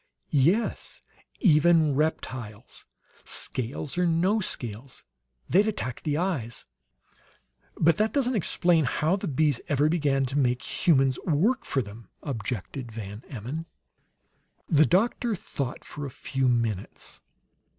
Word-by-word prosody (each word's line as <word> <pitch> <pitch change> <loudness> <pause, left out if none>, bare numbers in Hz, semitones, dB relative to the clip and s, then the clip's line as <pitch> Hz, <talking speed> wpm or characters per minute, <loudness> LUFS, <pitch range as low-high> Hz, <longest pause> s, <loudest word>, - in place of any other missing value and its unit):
"Yes; 170 - +1 0.4
even 160 - +5
reptiles, 130 -6 -3 0.4
scales 130 +5 -2
or 180 - +3
no 180 +6 +2
scales. 125 - -4 0.4
They'd 200 +4 +4
attack 130 - -3
the 150 -1 -1
eyes." 150 -11 -2 1.1
"But 165 +1 +3
that 215 0 +2
doesn't 260 0 +1
explain 175 -4 +3
how 155 +7 +1
the 200 - -4
bees 145 -2 +1
ever 145 +1 +3
began 145 -5 +1
to 135 +3 -1
make 125 0 +1 0.2
humans 135 -5 +4
work 190 - +1
for 135 - 0
them," 105 +1 -12 0.2
objected 120 0 -4
Van 105 -1 -7
Emmon. 140 +7 -5 1.0
The 155 -2 +4
doctor 225 +4 +1
thought 140 -7 -5
for 145 -1 -6
a - - -6
few 135 +1 -2
minutes. 115 -5 -2
145 Hz, 120 wpm, -27 LUFS, 125-170 Hz, 1.1 s, even